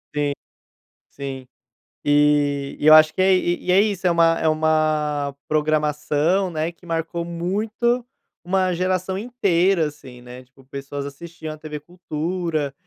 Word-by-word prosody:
Sim, 145 Hz, -1 st, 0 dB, 0.8 s
sim, 135 Hz, -2 st, -7 dB, 0.6 s
e, 145 Hz, -1 st, +2 dB
eu 155 Hz, +1 st, +7 dB
acho 155 Hz, 0 st, +7 dB
que 185 Hz, -, -1 dB
é 190 Hz, 0 st, +5 dB
e 175 Hz, 0 st, -1 dB
é 195 Hz, +2 st, +6 dB
isso, 200 Hz, -3 st, -2 dB
é 180 Hz, -, +4 dB
uma, 165 Hz, -1 st, +3 dB
é -, -, 0 dB
uma 155 Hz, -2 st, +1 dB
programação, 155 Hz, +4 st, +1 dB
né, 160 Hz, 0 st, -2 dB
que 175 Hz, +1 st, -21 dB
marcou 165 Hz, 0 st, -3 dB
muito, 210 Hz, +8 st, -1 dB, 0.4 s
uma 185 Hz, 0 st, +1 dB
geração 185 Hz, +1 st, -1 dB
inteira, 195 Hz, -7 st, +1 dB
assim, 130 Hz, -4 st, -12 dB
né, 125 Hz, +1 st, -11 dB
tipo 130 Hz, +1 st, -23 dB
pessoas 140 Hz, +1 st, -6 dB
assistiam 160 Hz, +2 st, -8 dB
à -, -, -11 dB
tv 150 Hz, -1 st, -7 dB
cultura 165 Hz, -2 st, -3 dB
155 Hz, 140 wpm, -22 LUFS, 145-180 Hz, 0.8 s, eu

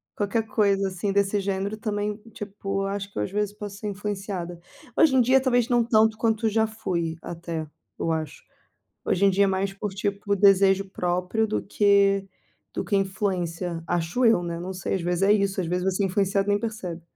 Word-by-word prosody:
Qualquer 215 Hz, +2 st, 0 dB
coisa 200 Hz, -2 st, +2 dB
assim 190 Hz, +2 st, -2 dB
desse 200 Hz, +1 st, +2 dB
gênero 195 Hz, +1 st, -2 dB
também, 210 Hz, -1 st, -2 dB, 0.2 s
tipo, 195 Hz, -1 st, -4 dB
acho 200 Hz, 0 st, -4 dB
que -, -, -12 dB
eu -, -, +1 dB
às -, -, -4 dB
vezes 210 Hz, 0 st, -1 dB
posso 205 Hz, -1 st, -7 dB
ser 210 Hz, -, -5 dB
influenciada. 195 Hz, -4 st, -4 dB, 0.4 s
Hoje 295 Hz, -5 st, +5 dB
em 255 Hz, -, +6 dB
dia, 260 Hz, +3 st, +4 dB
talvez 245 Hz, -3 st, +2 dB
não 240 Hz, -1 st, +4 dB
tanto 220 Hz, -2 st, +3 dB
quanto 225 Hz, -1 st, +1 dB
já 220 Hz, +1 st, +2 dB
fui 175 Hz, -7 st, -3 dB
até, 170 Hz, -2 st, -5 dB, 0.3 s
eu 165 Hz, -, -1 dB
acho. 160 Hz, -2 st, -4 dB, 0.6 s
Hoje 195 Hz, +2 st, +2 dB
em 195 Hz, -, +5 dB
dia 200 Hz, +2 st, +3 dB
é -, -, +3 dB
mais 195 Hz, +1 st, 0 dB
por 205 Hz, 0 st, -4 dB
tipo 200 Hz, +1 st, -1 dB
desejo 195 Hz, 0 st, +4 dB
próprio 180 Hz, +5 st, 0 dB
do 215 Hz, -, -2 dB
que 200 Hz, -1 st, +3 dB, 0.5 s
do -, -, -1 dB
que 200 Hz, -, +1 dB
influência. 180 Hz, -3 st, -2 dB
Acho 175 Hz, +10 st, 0 dB
eu, 225 Hz, -6 st, +5 dB
né? 170 Hz, -1 st, -4 dB
Não 185 Hz, +2 st, -5 dB
sei, 185 Hz, +1 st, -3 dB
às 185 Hz, -, -1 dB
vezes 175 Hz, +2 st, -1 dB
é 200 Hz, +1 st, +5 dB
isso. 195 Hz, -2 st, 0 dB
Às 175 Hz, -, -2 dB
vezes 180 Hz, +2 st, -1 dB
você 190 Hz, +1 st, 0 dB
é -, -, +3 dB
influenciado 195 Hz, +1 st, +1 dB
e -, -, +3 dB
nem 205 Hz, -, +3 dB
percebe. 185 Hz, -7 st, -5 dB
195 Hz, 205 wpm, -25 LUFS, 185-210 Hz, 0.6 s, em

